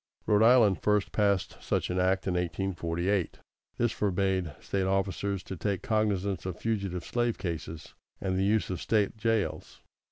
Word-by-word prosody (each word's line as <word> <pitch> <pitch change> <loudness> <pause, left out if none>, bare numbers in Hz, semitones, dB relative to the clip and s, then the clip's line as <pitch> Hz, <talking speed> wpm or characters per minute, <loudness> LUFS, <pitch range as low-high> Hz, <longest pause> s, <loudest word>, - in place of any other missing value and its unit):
Rhode 105 0 +3
Island 115 -4 +5
first 105 -1 +1
passed 100 -3 +1
such - - -1
an 90 - 0
act 95 +1 +1
in 95 - 0
1848. 90 +1 -1 0.4
This 120 -1 +2
forbade 95 -4 0
State 95 -1 -1
officers 95 0 -1
to 95 - -6
take 95 +2 -2
cognizance 100 -3 0
of 90 - -4
fugitive 100 -6 -2
slave 120 -1 0
cases, 80 -3 -5 0.3
and 95 -1 -1
the 95 - +1
use 105 0 +1
of 90 - -4
State 105 -2 +1
jails. 110 -1 -1
95 Hz, 155 wpm, -29 LUFS, 90-105 Hz, 0.4 s, Island